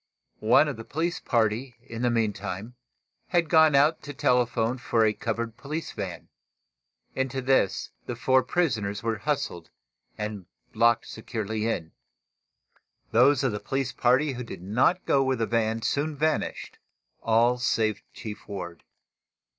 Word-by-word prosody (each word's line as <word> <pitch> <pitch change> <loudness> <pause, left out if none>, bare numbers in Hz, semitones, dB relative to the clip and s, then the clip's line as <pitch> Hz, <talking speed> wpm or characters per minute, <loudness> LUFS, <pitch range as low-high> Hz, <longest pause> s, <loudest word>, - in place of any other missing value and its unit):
One 115 +7 +5
of 140 -6 -4
the 115 - -7
police 165 +8 -2
party, 115 +1 0
in 115 -3 -7
the 125 - +2
meantime, 105 -1 -2 0.5
had 170 -3 +1
gone 160 -3 +6
out 150 +4 +4
to 145 -1 -8
telephone 120 -1 +1
for 115 -2 +2
a 105 - +2
covered 115 +1 -3
police 155 +5 -5
van. 95 -5 -6 0.9
Into 130 0 -2
this 130 -7 +1 0.2
the 120 - -3
four 130 +2 +3
prisoners 120 - -1
were 115 -2 -1
hustled 135 - -2 0.5
and 105 -4 -5 0.3
locked 120 0 +3
securely 110 -1 -4
in. 80 -8 -2 1.2
Those 130 +4 +5
of 130 - +2
the 105 - -3
police 135 +1 -2
party 130 +4 +2
who 125 0 -5
did 105 -6 -9
not 125 - +2
go 135 - +3
with 130 -1 0
the 115 - 0
van 115 -1 0
soon 145 +1 -1
vanished, 155 +2 -1 0.4
all, 120 +2 +3
save 110 -4 +1
Chief 110 -2 -8
Ward. 85 -4 -7
120 Hz, 145 wpm, -27 LUFS, 110-135 Hz, 1.2 s, gone